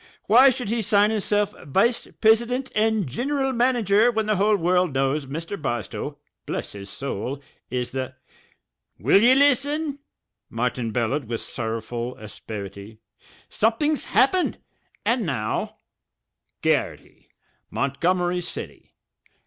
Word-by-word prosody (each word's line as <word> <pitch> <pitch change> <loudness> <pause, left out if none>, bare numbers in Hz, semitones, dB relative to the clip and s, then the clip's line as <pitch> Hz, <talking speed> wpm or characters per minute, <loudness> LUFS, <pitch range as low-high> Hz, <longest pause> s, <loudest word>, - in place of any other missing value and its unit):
Why 250 +6 +7
should 250 -4 -3
he 230 +1 0
sign 205 +1 +3
hisself 210 -1 0
vice 210 - +1
prisident 235 +4 +3
and 220 -2 +2
giniral 270 - -1
manager 235 -3 +3
when 220 -2 -1
the 215 -1 +1
whole 210 +2 +3
world 180 -4 +1
knows 135 +1 0
Mr. 165 +7 -5
Barstow, 120 -3 -4 0.3
bless - - -3
his 100 -1 -9
soul, 135 +3 -4 0.3
is 125 0 -2
the 130 0 -4 0.4
" - - -52
"Will 200 - +4
ye 245 +3 +6
listen?" 285 +2 +2 0.5
Martin 120 0 -2
bellowed 125 +5 -1
with 115 0 -3
sorrowful 115 +1 -4
asperity. 105 0 -8 0.5
"Somethin's 270 +8 +1
happened. 360 +7 +2 0.5
And 235 0 +2
now: 125 - -2 0.9
GARRITY, - - -1 0.4
Montgomery 175 +6 0
City. 175 - -8
190 Hz, 115 wpm, -24 LUFS, -, 0.9 s, Why